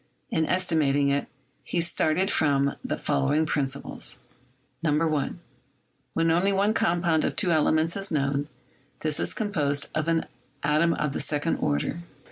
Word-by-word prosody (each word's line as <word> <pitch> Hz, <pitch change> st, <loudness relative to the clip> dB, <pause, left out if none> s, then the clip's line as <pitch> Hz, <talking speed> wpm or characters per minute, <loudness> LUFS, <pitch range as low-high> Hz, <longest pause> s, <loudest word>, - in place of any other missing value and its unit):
In 160 Hz, -1 st, +1 dB
estimating 150 Hz, -6 st, +2 dB
it, 140 Hz, 0 st, 0 dB, 0.4 s
he 175 Hz, -, -2 dB
started 170 Hz, +2 st, +1 dB
from 140 Hz, -2 st, +2 dB
the -, -, -2 dB
following 150 Hz, -, +1 dB
principles: 140 Hz, -3 st, -2 dB, 0.6 s
1. 155 Hz, 0 st, 0 dB, 0.8 s
When 165 Hz, 0 st, +2 dB
only 180 Hz, +4 st, +3 dB
one 200 Hz, +2 st, +2 dB
compound 170 Hz, -4 st, +2 dB
of -, -, -1 dB
two 180 Hz, -, +2 dB
elements 160 Hz, +1 st, +2 dB
is 195 Hz, 0 st, -2 dB
known, 140 Hz, -1 st, 0 dB, 0.5 s
this 155 Hz, -1 st, 0 dB
is -, -, -1 dB
composed 150 Hz, -9 st, 0 dB
of 155 Hz, +1 st, -1 dB
an 165 Hz, -1 st, +1 dB, 0.4 s
atom 155 Hz, +3 st, +3 dB
of 150 Hz, -2 st, -1 dB
the -, -, -2 dB
second 150 Hz, +2 st, 0 dB
order. 75 Hz, -, -1 dB
155 Hz, 140 wpm, -26 LUFS, 145-170 Hz, 0.8 s, only